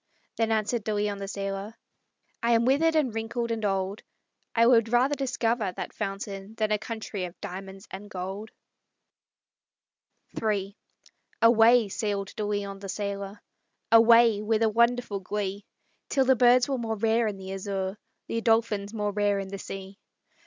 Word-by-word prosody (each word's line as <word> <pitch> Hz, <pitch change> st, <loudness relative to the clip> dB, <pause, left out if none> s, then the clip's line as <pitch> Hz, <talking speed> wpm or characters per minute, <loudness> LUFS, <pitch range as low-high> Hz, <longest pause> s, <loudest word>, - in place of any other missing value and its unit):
Then 225 Hz, -1 st, 0 dB
answered 220 Hz, +1 st, 0 dB
De 215 Hz, 0 st, -1 dB
Leon, 205 Hz, -1 st, -1 dB
the 195 Hz, -, -5 dB
sailor: 195 Hz, +2 st, -4 dB, 0.7 s
"I 235 Hz, 0 st, +3 dB
am 230 Hz, 0 st, +3 dB
withered, 315 Hz, +5 st, +3 dB
and 280 Hz, -7 st, +2 dB
wrinkled, 230 Hz, +1 st, -3 dB
and 225 Hz, -1 st, -2 dB
old; 195 Hz, +1 st, -1 dB, 0.5 s
I 230 Hz, 0 st, +5 dB
would 230 Hz, -2 st, +5 dB
rather 250 Hz, +4 st, +3 dB
discover 240 Hz, -6 st, 0 dB
that -, -, -6 dB
fountain 195 Hz, 0 st, -5 dB
Than 215 Hz, -1 st, 0 dB
a 210 Hz, -, +2 dB
country 220 Hz, -4 st, -5 dB
of 175 Hz, 0 st, -10 dB
diamonds 195 Hz, 0 st, -8 dB
and 200 Hz, +2 st, -8 dB
gold." 195 Hz, +3 st, -5 dB, 1.9 s
III 200 Hz, -2 st, -1 dB, 0.7 s
Away 230 Hz, 0 st, +6 dB
sailed 200 Hz, -1 st, -3 dB
De 215 Hz, -, -3 dB
Leon, 205 Hz, -1 st, -3 dB
the 195 Hz, 0 st, -8 dB
sailor; 200 Hz, 0 st, -4 dB, 0.5 s
Away 230 Hz, -1 st, +6 dB
with 220 Hz, +1 st, +1 dB
a 220 Hz, -, +4 dB
wonderful 235 Hz, -2 st, +1 dB
glee, 200 Hz, +1 st, -4 dB, 0.4 s
Till 270 Hz, -2 st, +2 dB
the 265 Hz, 0 st, +5 dB
birds 245 Hz, +1 st, +5 dB
were 270 Hz, -2 st, -1 dB
more 225 Hz, -1 st, -2 dB
rare 225 Hz, +2 st, +2 dB
in 205 Hz, -2 st, -3 dB
the 190 Hz, 0 st, -7 dB
azure, 195 Hz, 0 st, -3 dB, 0.3 s
The 230 Hz, -, -2 dB
dolphins 225 Hz, -2 st, +1 dB
more 210 Hz, -1 st, -1 dB
rare 205 Hz, 0 st, +1 dB
in 195 Hz, -1 st, -4 dB
the 195 Hz, 0 st, -6 dB
sea. 195 Hz, +1 st, -8 dB
210 Hz, 160 wpm, -27 LUFS, 195-230 Hz, 1.9 s, Away